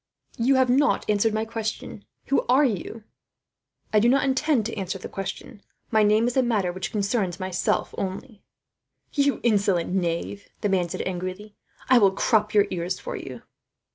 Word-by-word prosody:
"You 260 +4 +3
have 260 -1 +4
not 280 +3 +2
answered 210 +1 +2
my 220 +1 -1
question. 220 -2 -5 0.2
Who 275 - +2
are 270 +4 +5
you?" 220 -1 -3 0.9
"I 215 - +6
do 235 +3 +4
not 275 +2 +3
intend 270 -3 +1
to 230 - -4
answer 190 -2 -3
the 185 - -8
question. 195 +2 -7 0.3
My 220 -1 +4
name 215 +2 +4
is 245 - -1
a 260 - +4
matter 215 -7 0
which 185 +1 -5
concerns 200 -3 -1
myself 185 -1 -1
only." 200 +4 -5 0.7
"You 280 -1 +1
insolent 200 -6 +1
young 190 - +2
knave," 175 +4 -3
the 205 - 0
man 180 -3 +1
said 185 - -4
angrily, 185 +3 -5 0.3
"I 255 -1 +6
will 200 -3 +6
crop 210 +2 +1
your 205 -1 +6
ears 180 +1 -2
for - - -6
you." - - -8
210 Hz, 175 wpm, -25 LUFS, 190-240 Hz, 0.9 s, I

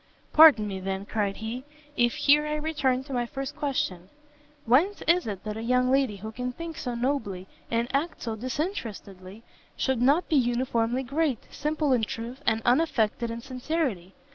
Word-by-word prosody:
"Pardon 300 -9 +8
me, 195 -2 -4
then," 190 +1 -3
cried 205 -2 -1
he, 230 +4 -5 0.3
"if 240 0 +2
here 295 +1 +4
I 300 - -1
return 295 -4 0
to 275 0 -8
my 240 -1 0
first 270 +2 -5
question: 190 -11 -2 0.6
whence 310 - +3
is 345 -2 +3
it 200 -3 -5
that 215 -1 -4
a - - -4
young 250 +2 +2
lady 265 -5 +2
who 215 +3 -7
can 250 +2 -4
think 330 +5 -7
so 245 -3 -4
nobly, 235 -7 -2 0.2
and 230 +1 0
act 310 +5 -2
so 225 -2 -3
disinterestedly, 220 - -5 0.3
should 265 -3 0
not 285 +8 +3
be 310 - +2
uniformly 245 0 +1
great, 280 -1 -1
simple 300 -1 0
in 240 -3 +2
truth, 230 +4 -5
and 225 0 +2
unaffected 240 -4 +2
in 230 +1 -5
sincerity? 255 - -3
250 Hz, 170 wpm, -27 LUFS, 220-285 Hz, 0.6 s, Pardon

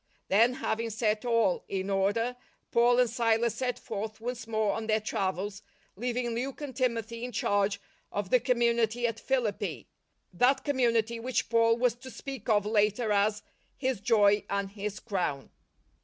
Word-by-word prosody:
Then, 230 +5 +5
having 230 -3 -2
set 220 0 0
all 230 -6 +2
in 195 0 -2
order, 205 +5 +1 0.4
Paul 240 +1 +4
and 250 -1 +5
Silas 230 -1 +1
set 250 0 -2
forth 215 0 -5
once 240 0 -5
more 220 -2 +1
on 225 -1 -4
their 215 0 +3
travels, 195 -1 -2 0.3
leaving 240 +2 -2
Luke 255 +3 -3
and 290 -3 -6
Timothy 230 -2 -1
in 250 - -4
charge 200 -2 +1 0.3
of 200 -2 -3
the 255 - +6
community 235 -1 +1
at 230 -1 -1
Philippi 245 -6 -1 0.3
— - - -48
that 250 +9 +3
community 235 -5 +1
which 255 +2 -1
Paul 230 0 +4
was 245 -1 +2
to 260 +2 -10
speak 265 -3 -7
of 205 -2 +3
later 210 +1 +1
as 210 +1 +2 0.2
" - - -38
his 260 -5 -1
joy 205 -2 +4
and 200 -1 -2
his 205 0 -5
crown." 175 - -3
230 Hz, 165 wpm, -29 LUFS, 205-245 Hz, 0.4 s, the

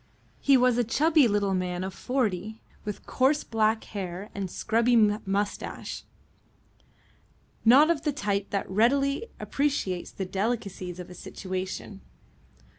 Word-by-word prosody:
He 275 -1 +5
was 250 -1 +3
a - - +4
chubby 300 +4 +4
little 200 -2 +1
man 180 -1 -1
of 190 0 -4
forty, 220 -3 -2 0.2
with 210 -2 -6
coarse 275 +3 +2
black 220 -1 +1
hair 195 0 -6
and 195 -2 -4
scrubby 230 +6 +1
moustache, 205 -2 0 1.6
not 275 +8 +7
of 310 -4 0
the 300 -1 0
type 205 -6 -2
that 200 - -2
readily 275 - +2
appreciates 270 -11 -1
the 190 - -5
delicacies 190 -3 -3
of 180 0 -8
a - - -8
situation. 185 +2 -6
210 Hz, 125 wpm, -27 LUFS, 190-250 Hz, 1.6 s, not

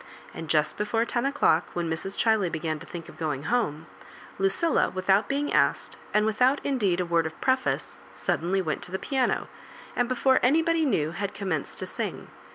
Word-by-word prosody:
And 165 - -7
just 155 -1 +2
before 225 +2 0
ten 240 +2 0
o'clock, 275 - +2
when 175 -1 -1
Mrs. 165 +4 -4
Chiley 220 -6 +2
began 155 -1 -2
to - - -12
think 170 -2 -8
of - - -13
going 150 -4 -2
home, 160 -6 0 0.5
Lucilla, 195 +12 +2
without 190 +2 +2
being 285 +1 -1
asked, - - +2 0.2
and 210 0 +3
without 250 +6 +3
indeed 205 -10 +1
a 180 - 0
word 170 -1 +2
of 160 - -10
pre&ce, 260 0 0 0.2
suddenly 185 +3 0
went 155 -3 -2
to 180 - -11
the 190 - -1
piano, 265 +3 0 0.5
and 245 0 +1
before 260 +1 +3
anybody 325 +5 +3
knew, 155 - +1
had 195 +4 -4
commenced 185 -7 -3
to - - -4
sing. - - -5
195 Hz, 180 wpm, -27 LUFS, 165-250 Hz, 0.5 s, and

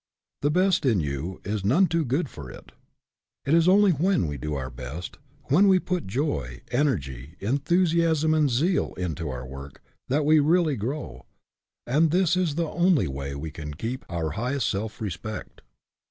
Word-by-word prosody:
The 145 - +2
best 185 +4 +2
in 120 -8 +3
you 75 +4 -3
is 105 -1 -2
none 140 - +4
too 170 -2 0
good 145 +5 0
for 70 - -10
it. - - -12 0.7
It 140 - +1
is 165 +1 +5
only 200 +1 +6
when 175 - +2
we 75 -2 -3
do 75 +2 -4
our 65 -2 -4
best, 65 +8 -7 0.3
when 185 +9 +4
we 190 -1 +6
put 180 - -2
joy, 95 - -2
energy, 80 - -1
enthusiasm 160 - +2
and 155 -2 +3
zeal 160 +10 +1
into 80 -4 -3
our 65 -1 -5
work, 70 +1 -10 0.2
that 145 +3 +1
we 155 +1 +6
really 160 0 +3
grow; 130 +7 -5 0.6
and 150 +6 +3
this 180 +1 +2
is 180 -5 0
the 165 0 0
only 175 - +3
way 70 0 -5
we 75 +3 -5
can 75 -2 -7
keep 120 - -4
our 85 -2 -2
highest 125 - -1
self 105 +3 -3
respect. 105 +2 -6
125 Hz, 170 wpm, -26 LUFS, -, 0.7 s, only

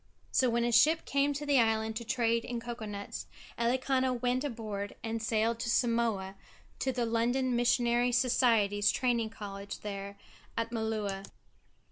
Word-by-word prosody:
So 255 - +3
when 235 0 +1
a 240 - +1
ship 305 +8 +4
came 280 +1 +2
to 295 +1 -4
the 285 -2 +4
island 220 -1 +1
to 235 - -5
trade 230 0 +1
in 240 -1 -4
cocoa 235 -1 -6
nuts 200 -1 -6 0.3
Elikana 260 +2 +1
went 250 +2 0
aboard 215 -6 -4
and 225 0 -3
sailed 225 +1 +1
to 235 0 -2
Samoa 230 -6 +1 0.5
to 265 - 0
the 245 -2 -1
London 240 +3 +1
Missionary 240 0 +2
Society's 230 -5 +3
training 240 -3 +1
college 200 -2 -7
there 200 -1 -6 0.4
at 230 0 -1
Malua. 215 -4 -2
235 Hz, 150 wpm, -31 LUFS, 220-245 Hz, 0.5 s, ship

